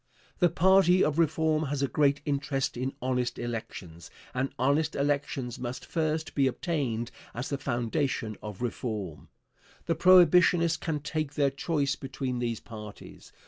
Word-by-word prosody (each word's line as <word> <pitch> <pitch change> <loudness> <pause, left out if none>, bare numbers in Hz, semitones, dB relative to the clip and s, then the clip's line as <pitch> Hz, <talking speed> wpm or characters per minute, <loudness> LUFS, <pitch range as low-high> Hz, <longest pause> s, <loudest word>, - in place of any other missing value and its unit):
The 175 -2 +5
party 185 +1 +5
of 150 +1 +1
reform 160 -1 +2
has 140 0 -2
a - - +2
great 145 +2 +2
interest 140 -2 -1
in 130 +2 -3
honest 125 -1 -1
elections, 100 -8 -6 0.2
and 130 +2 -1
honest 145 +5 +1
elections 140 -3 -1
must 125 0 -5
first 160 -1 -2
be 140 -2 +3
obtained 130 -6 -2 0.2
as 125 +3 -4
the 140 - -2
foundation 120 -2 -1
of 105 +1 -7
reform. 105 -9 -4 0.6
The 165 - +1
Prohibitionists 175 -1 +5
can 160 -3 -2
take 150 -1 -3
their 140 -2 +2
choice 140 0 -1
between 130 -2 -4
these 115 -2 -2
parties. 105 -2 -11
140 Hz, 145 wpm, -28 LUFS, 120-155 Hz, 0.6 s, The